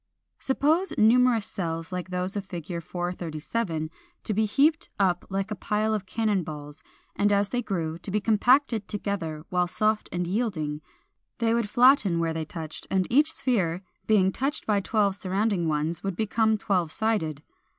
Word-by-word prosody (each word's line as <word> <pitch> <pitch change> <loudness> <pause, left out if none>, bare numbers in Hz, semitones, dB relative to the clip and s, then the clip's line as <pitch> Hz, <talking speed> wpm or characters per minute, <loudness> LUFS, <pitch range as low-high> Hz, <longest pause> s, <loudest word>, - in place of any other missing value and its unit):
= - - -54
Suppose 315 +8 +2
numerous 230 0 +4
cells 165 -2 -4
like 180 0 -4
those 180 +2 -2
of 200 - -2
Fig. 175 -3 -6
437 170 0 -3 0.3
to 215 - -1
be 215 +2 +2
heaped 295 +9 +2
up 180 -3 +2
like 195 +2 -2
a - - -1
pile 215 +2 0
of 200 -3 -3
cannon 215 -2 0
balls, 150 -2 -8 0.3
and 205 0 +2
as 200 0 +2
they 245 - -1
grew, 170 -7 -3
to - - -8
be 210 +2 +1
compacted 230 +1 +3
together 170 -7 -3
while 180 -1 +1
soft 215 +3 0
and 180 0 -1
yielding; 170 -7 -2 0.6
they 230 -1 +1
would 230 -3 0
flatten 245 -7 +5
where 165 -1 0
they 160 -1 -3
touched, 160 -1 -7
and 190 -1 +1
each 295 +5 +5
sphere, 200 - 0 0.2
being 195 -3 +4
touched 275 +8 -2
by 210 -2 +2
twelve 200 0 +1
surrounding 195 -2 0
ones 155 +2 -1
would 195 -2 -2
become 220 +2 +1
twelve 180 -6 0
sided. 160 -10 -1
195 Hz, 170 wpm, -26 LUFS, 170-220 Hz, 0.6 s, flatten